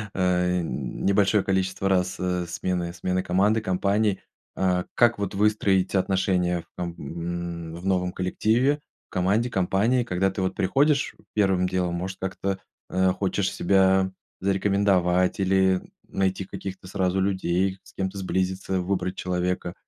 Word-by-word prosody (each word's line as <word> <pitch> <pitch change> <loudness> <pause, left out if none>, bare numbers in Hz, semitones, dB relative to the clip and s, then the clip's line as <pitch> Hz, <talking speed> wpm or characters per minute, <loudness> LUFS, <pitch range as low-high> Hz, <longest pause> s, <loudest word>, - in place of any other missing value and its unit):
э, 90 -1 +2
небольшое 95 - +1
количество 95 0 0
раз, 90 -1 +1
э, 90 -1 -1
смены 90 0 -2
смены 90 +1 -1
команды, 100 +5 +2
компаний? 100 +1 +1 0.4
А 90 -1 +1
как 120 -1 +4
вот 100 -2 -3
выстроить 100 -2 +2
отношения 90 -2 +1
там, 90 - -2
м, 85 +1 -5
в 85 +2 -9
новом 90 -2 +1
коллективе, 115 +10 +1 0.3
команде, 100 +6 +1
компании, 105 +6 +2
когда 95 -3 +1
ты 95 0 -4
вот 95 0 -1
приходишь 145 +8 +2 0.2
первым 95 -3 +2
делом, 90 -1 -1
может 95 +2 -4
как-то, 95 +1 -3 0.3
э, 95 0 +2
хочешь 95 0 -1
себя 95 0 +3 0.3
зарекомендовать, 95 -2 +2
или 95 -1 +3 0.3
найти 95 0 -1
каких-то 95 -1 -7
сразу 95 0 0
людей, 95 0 0
с - - -18
кем-то 95 0 -3
сблизиться, 95 0 -1
выбрать 95 0 -1
человека? 90 -1 -2
95 Hz, 130 wpm, -25 LUFS, 90-100 Hz, 0.4 s, как